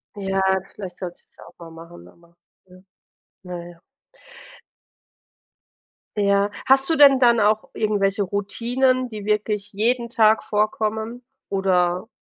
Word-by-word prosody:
Ja, 195 Hz, -1 st, -2 dB, 0.3 s
vielleicht 190 Hz, -3 st, -9 dB
sollte 175 Hz, -2 st, -7 dB
ich -, -, -22 dB
das -, -, -29 dB
ja -, -, -14 dB
auch -, -, -17 dB
mal 165 Hz, -1 st, -12 dB
machen, 165 Hz, -, -13 dB
aber, 170 Hz, -, -23 dB, 0.3 s
ja. 185 Hz, 0 st, -18 dB, 0.6 s
Na 175 Hz, -1 st, -7 dB
ja. 170 Hz, -1 st, -16 dB, 2.4 s
Ja. 200 Hz, 0 st, +2 dB, 0.2 s
Hast 270 Hz, +2 st, +4 dB
du 325 Hz, -, +1 dB
denn 275 Hz, -2 st, +7 dB
dann 235 Hz, -2 st, +4 dB
auch 215 Hz, +1 st, +1 dB
irgendwelche 205 Hz, -2 st, 0 dB
Routinen, 245 Hz, +6 st, -1 dB
die 215 Hz, -3 st, -8 dB
wirklich 210 Hz, -1 st, -1 dB
jeden 235 Hz, +3 st, 0 dB
Tag 220 Hz, -2 st, +3 dB
vorkommen, 220 Hz, +3 st, -2 dB, 0.3 s
oder? 185 Hz, 0 st, 0 dB
205 Hz, 135 wpm, -22 LUFS, 185-230 Hz, 2.4 s, denn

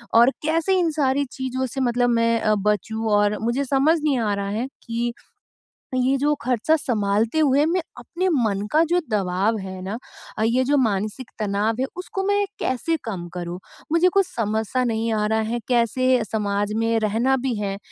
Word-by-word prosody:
और 235 Hz, +3 st, +7 dB
कैसे 330 Hz, +5 st, +2 dB
इन 340 Hz, -2 st, +2 dB
सारी 280 Hz, -2 st, +1 dB
चीज़ों 260 Hz, 0 st, -3 dB
से 265 Hz, +3 st, -4 dB
मतलब 245 Hz, 0 st, +2 dB
मैं 230 Hz, 0 st, +2 dB
अ, 215 Hz, 0 st, +2 dB
बचूँ 210 Hz, +2 st, -1 dB
और 205 Hz, 0 st, +2 dB
मुझे 240 Hz, +5 st, 0 dB
समझ 285 Hz, +5 st, +3 dB
नहीं 280 Hz, -4 st, +2 dB
आ 215 Hz, -3 st, 0 dB
रहा 200 Hz, 0 st, -3 dB
है 225 Hz, +6 st, -2 dB, 0.2 s
कि 235 Hz, +1 st, -2 dB, 0.8 s
ये 255 Hz, +2 st, +2 dB
जो 295 Hz, +2 st, +2 dB
खर्चा 250 Hz, +5 st, +2 dB
सँभालते 225 Hz, -1 st, 0 dB
हुए 290 Hz, 0 st, +4 dB
मैं 350 Hz, +2 st, +1 dB, 0.2 s
अपने 370 Hz, +2 st, -3 dB
मन 215 Hz, -, +1 dB
का 315 Hz, +2 st, +5 dB
जो 350 Hz, +1 st, +3 dB
दबाव 200 Hz, +2 st, +1 dB
है 190 Hz, -1 st, -7 dB
ना 195 Hz, +4 st, -4 dB, 0.4 s
अ, 215 Hz, -, 0 dB
ये 240 Hz, +3 st, +2 dB
जो 285 Hz, +3 st, +2 dB
मानसिक 215 Hz, 0 st, -1 dB
तनाव 210 Hz, +1 st, 0 dB
है, -, -, +2 dB
उसको 385 Hz, +1 st, -4 dB
मैं 405 Hz, 0 st, +2 dB
कैसे 290 Hz, +6 st, 0 dB
कम 185 Hz, -6 st, -4 dB
करूँ? 175 Hz, 0 st, -5 dB, 0.3 s
मुझे 335 Hz, +2 st, +4 dB
कुछ 395 Hz, -1 st, +4 dB
समझ 220 Hz, -, -1 dB
सा 255 Hz, 0 st, 0 dB
नहीं 230 Hz, -1 st, -1 dB
आ 210 Hz, -1 st, +1 dB
रहा 220 Hz, +1 st, +1 dB
है 240 Hz, -, -1 dB
कैसे 250 Hz, 0 st, +2 dB
समाज 205 Hz, -1 st, -1 dB
में 225 Hz, 0 st, +1 dB
रहना 225 Hz, +5 st, +1 dB
भी 250 Hz, -, 0 dB
है, 200 Hz, -2 st, -3 dB
235 Hz, 190 wpm, -23 LUFS, 210-270 Hz, 0.8 s, और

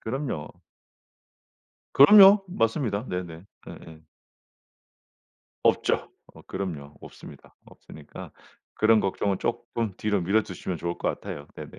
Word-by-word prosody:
그럼요. 120 Hz, -, -5 dB, 1.4 s
그럼요. 195 Hz, +6 st, +8 dB
맞습니다. 115 Hz, -, -1 dB
네네. 90 Hz, -2 st, -6 dB, 0.2 s
예예. 80 Hz, -1 st, -12 dB, 1.6 s
없죠. -, -, +1 dB, 0.2 s
어 -, -, -16 dB
그럼요. 80 Hz, -7 st, -7 dB
없습니다. -, -, -14 dB
없으니까 75 Hz, -2 st, -13 dB, 0.4 s
그런 110 Hz, 0 st, +3 dB
걱정은 95 Hz, 0 st, -2 dB
쪼끔 115 Hz, -3 st, -4 dB
뒤로 105 Hz, -2 st, -1 dB
미뤄 100 Hz, +5 st, +2 dB
두시면 90 Hz, -1 st, -6 dB
좋을 85 Hz, +2 st, -4 dB
것 -, -, -1 dB
같아요. 70 Hz, 0 st, -6 dB
네네. -, -, -11 dB
100 Hz, 255 characters per minute, -25 LUFS, 85-115 Hz, 1.6 s, 그럼요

